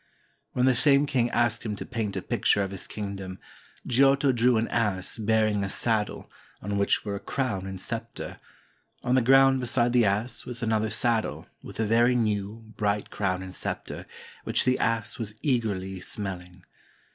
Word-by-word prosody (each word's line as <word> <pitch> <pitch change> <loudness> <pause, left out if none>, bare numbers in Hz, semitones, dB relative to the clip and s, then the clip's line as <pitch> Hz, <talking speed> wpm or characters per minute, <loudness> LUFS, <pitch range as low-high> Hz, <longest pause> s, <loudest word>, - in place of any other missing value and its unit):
When 125 - +2
the 130 - +5
same 140 +3 +5
king 125 -4 +1
asked 120 -1 +1
him 105 -2 -3
to - - -7
paint 115 -5 -3
a - - -3
picture 100 - +2
of 95 - -4
his 95 - -5
kingdom, 95 -3 -6 0.5
Giotto 135 +2 +4
drew 120 -1 +3
an 110 - 0
ass 105 -3 0
bearing 110 -1 +2
a 100 - -2
saddle, 110 0 -1 0.3
on 100 +1 -2
which 100 - +1
were 100 - -2
a 100 - -3
crown 100 -9 -2
and 95 -1 -6
scepter; - - -5 0.6
on 125 - +1
the 130 - +5
ground 135 +2 +5
beside 120 -1 +1
the 120 -2 +5
ass 105 +5 -1
was 125 -1 -5
another 110 -1 +1
saddle, 115 +1 0 0.2
with - - -11
a 110 - +2
very 120 +3 +4
new, 105 -1 -1
bright 105 -1 -1
crown 95 -2 -1
and 95 -1 -8
scepter, - - -5 0.4
which - - +2
the 130 0 +2
ass 115 0 -1
was 110 -2 -5
eagerly 100 -8 -1
smelHng. 90 -2 -6
110 Hz, 175 wpm, -27 LUFS, 100-120 Hz, 0.6 s, the